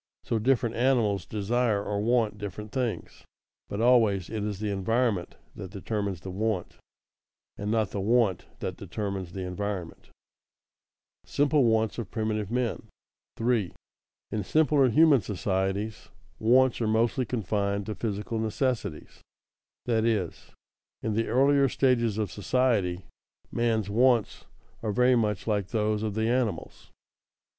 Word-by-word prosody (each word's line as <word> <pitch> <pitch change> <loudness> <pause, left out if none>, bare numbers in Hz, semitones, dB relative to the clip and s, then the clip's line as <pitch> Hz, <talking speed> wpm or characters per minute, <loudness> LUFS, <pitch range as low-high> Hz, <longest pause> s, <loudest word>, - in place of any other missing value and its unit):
So 115 - -1
different 120 0 +1
animals 115 -8 +1
desire 110 0 0
or 100 0 -2
want 110 -2 +1
different 105 +1 -6
things, 125 -3 -3 0.5
but 100 - -4
always 110 -6 +3
it 110 -2 -3
is 105 -2 -3
the 105 -1 -2
environment 105 -1 0 0.2
that 95 - -7
determines 100 -2 -3
the 95 - -7
want, 100 -1 -2 0.8
and 100 - -4
not 110 -3 +1
the 100 - -3
want 110 -1 +2 0.2
that - - -4
determines 100 -4 -5
the 95 - -5
environment. 90 -2 -4 1.2
[Sidenote: - - -15
Simple 145 0 +4
wants 110 0 +1
of 115 - -5
primitive 110 -2 -2
men] 120 0 -2 0.5
3. 115 -6 0 0.6
_In 105 -1 -1
simpler 145 +1 +3
human 150 0 +5
societies, 95 +1 -2 0.3
wants 125 +2 +4
are 115 - +1
mostly 115 +4 +2
confined 100 -4 -1
to 110 - -3
physical 105 +1 -3
necessities; 110 - -2 0.6
that 115 -2 +1
is, 105 -7 -1 0.5
in 110 - -1
the 115 +2 0
earlier 135 +3 +4
stages 120 -6 +2
of 105 -5 -1
society, 100 -4 0 0.5
man's 115 -3 0
wants 120 +1 +2 0.4
are 110 - -1
very 125 +4 +4
much 105 -4 0
like 105 -4 0
those 105 0 0
of 110 -2 -2
the 110 0 0
animals. 120 -7 -2
110 Hz, 135 wpm, -27 LUFS, 100-120 Hz, 1.2 s, human